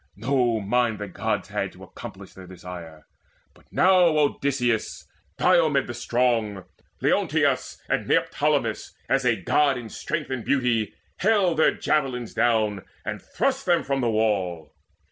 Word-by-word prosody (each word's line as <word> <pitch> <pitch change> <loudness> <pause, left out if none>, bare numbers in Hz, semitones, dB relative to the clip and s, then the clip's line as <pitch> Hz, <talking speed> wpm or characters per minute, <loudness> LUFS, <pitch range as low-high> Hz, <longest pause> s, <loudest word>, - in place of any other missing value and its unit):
No 120 0 +1
mind 115 +2 +1
The 105 - -5
Gods 90 - -2
had - - -3
to - - -14
accomplish - - -10
their 95 -1 -12
desire! 90 -3 -10 0.5
But - - -23
now 185 0 +4 0.2
Odysseus, 135 -5 0 0.3
Diomede 160 -6 +3
the 120 - -6
strong, 115 -5 0 0.4
Leonteus, - - +1
and - - -1
Neoptolemus, - - 0
as 135 -1 +1
a 120 -2 +4
God 135 - +2
In 120 -3 -7
strength 155 +3 -4
and 125 -3 -3
beauty, 125 -5 0 0.2
hailed 195 -5 +2
their 160 - +4
javelins 130 -6 -1
down, 110 -5 +1 0.2
And 105 -1 -4
thrust 270 -4 -1
them 175 -1 +3
from 135 -1 -1
the 120 - +1
wall. 95 -8 0
120 Hz, 140 wpm, -25 LUFS, 105-140 Hz, 0.5 s, now